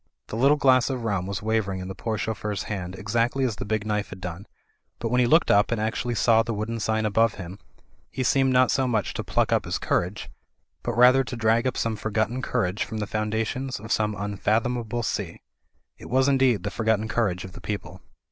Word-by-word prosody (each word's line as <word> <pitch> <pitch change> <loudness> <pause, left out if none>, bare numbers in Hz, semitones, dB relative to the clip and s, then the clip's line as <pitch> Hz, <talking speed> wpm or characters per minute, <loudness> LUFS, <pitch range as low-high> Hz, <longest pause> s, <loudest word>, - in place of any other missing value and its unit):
The - - -5
little 140 +6 +4
glass 130 -3 +4
of 130 -3 -3
rum 100 -5 -1
was 100 +2 -4
wavering 110 -4 0
in 90 - -6
the 95 - -5
poor 110 +2 -3
chauffeur's 105 -2 -3
hand 95 -3 -5
exactly 115 +6 0
as 120 -5 -1
the - - -5
big 110 0 -1
knife 105 -1 -1
had 95 - -9
done, 90 +2 -7 0.5
but 115 - -3
when 125 +2 +2
he 125 - +4
looked 160 +6 +4
up 100 +3 +4
and 115 - 0
actually 115 +2 -1
saw 115 +1 +4
the 115 0 -3
wooden 110 +2 -3
sign 110 0 0
above 110 +1 +2
him, 95 +1 -8 0.5
he 130 - -3
seemed 135 +1 +3
not 130 0 +4
so 130 -1 +1
much 110 -6 0
to - - -4
pluck - - 0
up - - +2
his - - -2
courage, 90 +4 -1 0.5
but - - -3
rather 125 +2 +6
to 125 - -5
drag 115 +1 +2
up 130 - -2
some 115 -1 -1
forgotten 110 +4 -1
courage 95 -4 -1
from 110 - -6
the 105 - -2
foundations 110 +5 -2
of 110 +2 -8
some 105 -1 +1
imfathomable 110 +4 -1
sea. 90 -5 -4 0.6
It - - -10
was 130 +1 +3
indeed 130 -8 +3
the 100 - -3
forgotten 110 -1 0
courage 100 -5 -1
of 95 - -9
the - - -11
people. 95 -3 -5
110 Hz, 215 wpm, -25 LUFS, 105-120 Hz, 0.6 s, rather